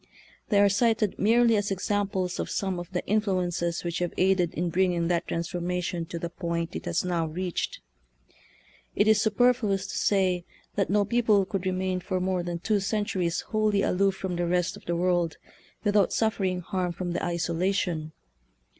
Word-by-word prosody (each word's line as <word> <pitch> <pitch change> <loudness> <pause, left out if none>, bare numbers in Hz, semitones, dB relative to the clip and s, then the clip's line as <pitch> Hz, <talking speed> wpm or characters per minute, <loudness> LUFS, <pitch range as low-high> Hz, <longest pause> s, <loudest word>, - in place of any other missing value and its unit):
They 205 -3 +4
are 200 - +6
cited 215 0 +1
merely 230 +2 +4
as 205 -1 0
examples 195 -1 -1
of - - -2
some 190 -3 -1
of 175 +1 -8
the 180 - -2
influ 200 -4 +1
ences 170 -1 -2
which 170 -1 -2
have 175 -1 -2
aided 185 -2 +3
in 175 +1 -1
bringing 175 -1 +1
that 175 -1 0
transformation 175 0 -2
to 170 - -5
the 170 - -3
point 170 -1 -3
it - - -5
has 170 - 0
now 170 -3 0
reached. 175 +3 -3 1.1
It 205 - +3
is 220 -1 +5
superfluous 220 -3 +2
to - - -6
say 185 -3 +2 0.3
that 195 - 0
no 205 +1 +3
people 215 -3 +3
could 190 -1 -3
remain 185 0 -1
for 185 +1 -2
more 185 0 0
than 175 0 -3
two 210 +4 0
centuries 195 -4 -1
wholly 215 -2 +1
aloof 195 +1 +2
from 185 -2 -4
the 175 0 0
rest 180 +1 +1
of - - -14
the 170 - -1
world 175 -1 +1 0.5
without 205 -2 +3
suffering 190 -5 0
harm 180 0 -2
from 175 0 -4
the 175 - -2
isolation. 170 -1 -1
185 Hz, 175 wpm, -27 LUFS, 175-200 Hz, 1.1 s, are